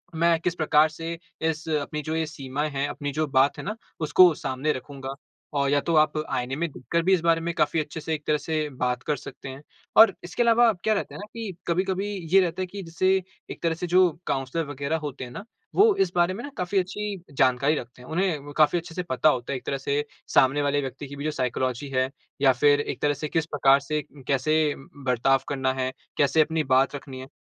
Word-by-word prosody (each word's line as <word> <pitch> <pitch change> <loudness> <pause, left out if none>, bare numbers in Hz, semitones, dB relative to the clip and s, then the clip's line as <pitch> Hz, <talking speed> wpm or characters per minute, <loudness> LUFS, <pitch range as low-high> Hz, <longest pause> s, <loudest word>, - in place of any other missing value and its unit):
मैं 165 0 +3
किस 170 +1 -1
प्रकार 155 -1 +4
से 165 +2 -6 0.2
इस 160 0 -1
अपनी 150 0 -1
जो 155 +1 -3
ये 160 0 0
सीमाएँ 150 -1 -4
हैं, 140 +1 -1
अपनी 145 -1 -4
जो 155 +2 -1
बात 135 0 +3
है - - -6
ना, 215 - -3 0.2
उसको 165 +3 +6
सामने 135 +3 -2
रखूँगा? 135 +1 -7 0.4
और 140 -1 +1
या 145 +1 +3
तो 165 +2 0
आप 155 - +4 0.2
आईने 125 +2 -1
में 170 +3 -1
देखकर 165 +6 -2
भी 190 +3 +4
इस 180 - +3
बारे 165 -1 +3
में 170 +1 -2
काफ़ी 160 -1 +1
अच्छे 150 +1 -4
से 160 +1 -3
एक 150 -1 -4
तरह 150 -1 +3
से 155 -1 -2
बात 125 0 0
कर 150 - 0
सकते 135 - -9
हैं। 135 +2 -9 0.4
और 220 -3 +9
इसके 180 +7 -1
अलावा 235 0 +5
क्या 220 - +3
रहता 205 - -3
है - - -7
ना 205 - -6
कि 225 -5 -5
कभी-कभी 190 +3 0 0.3
ये 195 - +8
रहता 180 0 -1
है - - 0
कि 200 +2 -7
जैसे 170 +3 0 0.4
एक - - -9
तरह 165 -1 +2
से 175 +2 -4
जो 180 +1 +5 0.2
काउंसलर 135 +5 -1
वग़ेेरह 145 +2 -2
होते 145 -4 -6
है 125 - -7
ना, 155 - -7 0.3
वो 425 0 +6
इस 185 -2 +1
बारे 175 +1 +3
में 230 - -6
ना 285 - -6
काफ़ी 180 +2 +1
अच्छी 195 0 -4
जानकारी 135 +2 +2
रखते 120 +1 -11
हैं। 125 - -13
उन्हें 160 -4 -1
काफ़ी 155 +3 +4
अच्छे 165 -1 -11
से 180 - -2
पता 155 -2 +2
होता 125 -1 -1
है - - -1
एक - - -12
तरह 140 - -1
से 140 +2 -1 0.3
सामने 135 +3 +4
वाले 145 0 +1
व्यक्ति 135 +1 -6
की 140 - -9
भी 140 - -6
जो 155 - 0
साइकोलॉजी 130 0 -2
है, 130 0 +2 0.3
या 135 -2 +6
फिर 145 +3 +4
एक 135 -2 -5
तरह 145 - +3
जैसे 150 +2 -4
किस 160 +1 0
प्रकार 140 -3 +4
से 150 +2 -2 0.3
कैसे 155 +4 +2 0.4
बर्ताव 130 +2 +3
करना 130 -2 0
है? 130 -1 -2 0.3
कैसे 145 +2 +4
अपनी 160 0 +1
बात 130 +1 +2
रखनी 135 -2 -8
है? 130 - -8
150 Hz, 235 wpm, -25 LUFS, 135-170 Hz, 0.4 s, और